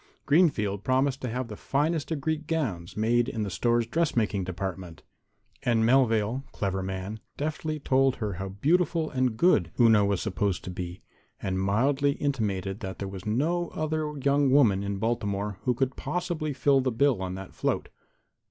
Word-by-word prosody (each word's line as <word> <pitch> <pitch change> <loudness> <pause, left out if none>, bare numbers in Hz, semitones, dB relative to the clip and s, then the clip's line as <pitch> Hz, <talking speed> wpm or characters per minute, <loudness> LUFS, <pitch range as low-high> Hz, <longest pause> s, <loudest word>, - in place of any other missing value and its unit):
Greenfield 110 - +2
promised 130 +1 +1
to 125 - -3
have 125 +2 -3
the 105 - -7
finest 150 +6 -1
of 160 -4 -2
Greek 155 +1 -2
gowns 110 - -2
made 120 +3 +2
in 110 -4 -2
the 100 - -4
store's 120 +5 +1
dressmaking 115 - 0
department. 90 -2 -5 0.6
And 115 -2 +2
Melvale, 120 -1 +3
clever 95 -1 -2
man, 95 +3 -4 0.2
deftly 155 +1 -2
told 135 -1 +2
her 105 -3 -3
how 95 - -4
beautiful 160 - +1
and 130 -4 0
good 110 - +4
Una 110 -3 +6
was 100 -2 +1
supposed 100 -2 -1
to 90 - -5
be, 90 0 -6 0.4
and 95 0 -2
mildly 135 +8 +2
intimated 105 -9 -2
that 95 -4 -6
there 100 - -4
was 95 +1 -7
no 165 +10 +1
other 155 -1 -1
young 140 0 +2
woman 120 -8 +4
in 100 0 -2
Baltimore 105 -3 -2
who 125 -1 +2
could 130 +1 0
possibly 160 0 -2
fill 135 0 +3
the 130 - 0
bill 120 -2 +2
on 95 -1 -3
that 95 -1 -8
float. - - -1
120 Hz, 170 wpm, -27 LUFS, 100-140 Hz, 0.6 s, Una